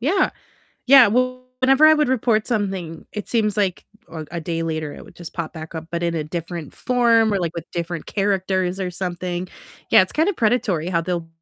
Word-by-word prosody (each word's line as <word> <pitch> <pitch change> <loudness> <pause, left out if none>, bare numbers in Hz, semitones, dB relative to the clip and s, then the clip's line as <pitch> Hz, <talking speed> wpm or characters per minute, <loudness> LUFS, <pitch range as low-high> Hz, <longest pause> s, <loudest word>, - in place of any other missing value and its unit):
yeah, 355 +10 +2 0.6
yeah, 265 -2 +9
well, 255 +3 0 0.2
whenever 270 +4 +5
I 310 - +7
would 300 -2 +1
report 230 -4 +1
something, 190 -8 -3
it 210 -2 -6
seems 215 -3 +1
like 195 -3 0 0.3
a 160 -1 -6
a 170 0 -4
day 165 +1 -3
later 155 -2 -3
it - - -11
would - - -16
just 170 -2 -9
pop 170 -3 -4
back 160 0 -9
up, 160 0 -6
but 170 0 -3
in 170 -1 0
a 155 -2 -2
different 165 0 -6
form 230 -3 +3
or, 200 - +1
like, 170 -3 -2
with 170 -1 -7
different 170 -1 -4
characters 190 -2 0
or 185 -1 -2
something. 180 0 -4 0.4
Yeah, - - +8
it's 185 - -4
kinda 325 +6 +2
predatory 220 - 0
how 170 -2 +1
they'll 170 -1 -3
185 Hz, 205 wpm, -21 LUFS, 170-230 Hz, 0.6 s, yeah